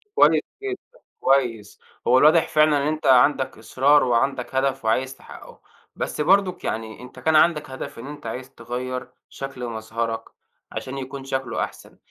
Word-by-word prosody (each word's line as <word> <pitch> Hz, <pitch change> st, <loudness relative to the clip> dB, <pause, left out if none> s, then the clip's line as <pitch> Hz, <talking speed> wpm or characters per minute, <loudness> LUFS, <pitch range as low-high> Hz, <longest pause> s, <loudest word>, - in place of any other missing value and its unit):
كويس -, -, +5 dB, 0.2 s
جدًا، 405 Hz, +5 st, -7 dB, 0.2 s
كويس، 120 Hz, -7 st, +1 dB, 0.3 s
هو 125 Hz, -, +6 dB
الواضح 155 Hz, +4 st, +5 dB
فعلًا 155 Hz, -1 st, +4 dB
إن -, -, 0 dB
أنت 155 Hz, 0 st, -2 dB
عندك 130 Hz, +1 st, +4 dB
إصرار، 135 Hz, +6 st, +3 dB
وعندك 125 Hz, +1 st, 0 dB
هدف 135 Hz, -1 st, 0 dB
وعايز 130 Hz, +4 st, 0 dB
تحققه. -, -, -14 dB, 0.3 s
بس -, -, -3 dB
برضك 185 Hz, +3 st, +3 dB
يعني 110 Hz, +1 st, -4 dB
أنت 125 Hz, -, -12 dB
كان 160 Hz, 0 st, +2 dB
عندك 155 Hz, -1 st, +4 dB
هدف 130 Hz, -3 st, -7 dB
إن 125 Hz, -, -8 dB
أنت 145 Hz, -3 st, -9 dB
عايز 125 Hz, +3 st, -6 dB
تغير 125 Hz, 0 st, -5 dB, 0.2 s
شكل 135 Hz, -2 st, -6 dB
مظهرك، 115 Hz, 0 st, -3 dB, 0.5 s
عشان 130 Hz, +1 st, -5 dB
يكون 135 Hz, +1 st, -6 dB
شكله 135 Hz, 0 st, -2 dB
أحسن. -, -, -9 dB
135 Hz, 155 wpm, -23 LUFS, 125-150 Hz, 0.5 s, هو